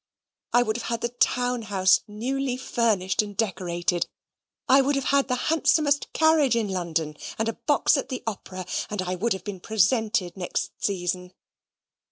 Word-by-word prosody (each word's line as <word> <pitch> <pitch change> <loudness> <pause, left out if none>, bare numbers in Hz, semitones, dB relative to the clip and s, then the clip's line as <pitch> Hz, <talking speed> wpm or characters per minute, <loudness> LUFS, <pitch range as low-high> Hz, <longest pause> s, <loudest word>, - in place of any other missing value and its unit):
I 245 - +5
would 220 -1 -1
have 240 - -6
had 230 0 -2
the 235 - 0
town 245 0 +1
house 190 -3 +3
newly 250 +5 -2
furnished 220 -8 +1
and 205 -2 -8
decorated. 175 -4 -1 0.6
I 270 +1 +6
would 280 +2 +1
have 275 - 0
had 280 -1 +3
the 250 - 0
handsomest 300 +1 +2
carriage 315 -6 +4
in 225 -3 0
London, 165 -4 -2 0.2
and 220 - 0
a 225 - 0
box 290 +2 +2
at 275 - -3
the 255 - -5
opera; 185 -4 -5 0.2
and 210 -3 -2
I 180 0 -2
would 205 +5 0
have 190 - -7
been 200 -3 -6
presented 215 -2 +1
next 180 -2 -3
season. 180 -1 -2
220 Hz, 170 wpm, -25 LUFS, 185-250 Hz, 0.6 s, I